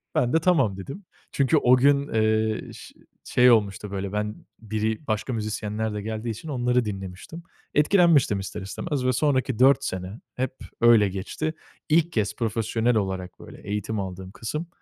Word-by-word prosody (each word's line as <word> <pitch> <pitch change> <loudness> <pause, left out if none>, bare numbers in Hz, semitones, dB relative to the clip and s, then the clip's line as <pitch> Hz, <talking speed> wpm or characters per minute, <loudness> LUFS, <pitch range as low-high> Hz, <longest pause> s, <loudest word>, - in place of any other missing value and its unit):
Ben 125 +2 +1
de 160 - +5
tamam 135 - +2
dedim. 140 - -8 0.3
Çünkü 140 +3 +2
o 125 -2 +5
gün, 140 +2 +3
ııı, 110 -1 0
ş - - -12 0.3
şey 125 0 +5
olmuştu 105 -2 +1
böyle 100 0 -4
ben 105 0 -2 0.2
biri 110 +4 -3
başka 110 +4 -1
müzisyenler 110 0 -3
de 105 - -4
geldiği 110 +2 -4
için 115 +8 -6
onları 125 -2 +1
dinlemiştim. 95 - -7 0.3
Etkilenmiştim 150 - +4
ister 95 +1 -6
istemez 130 - -4
ve 130 - +2
sonraki 130 -2 0
4 135 +2 +5
sene 95 +4 -5 0.2
hep 130 0 -2 0.3
öyle 115 -4 +6
geçti. 100 +12 -4 0.4
İlk 165 +2 +3
kez 105 -3 0
profesyonel 115 +1 0
olarak 95 -3 -3
böyle - - -12
eğitim 105 +1 -2
aldığım 95 0 -6
kısım 150 +12 -5
110 Hz, 160 wpm, -25 LUFS, 105-130 Hz, 0.4 s, öyle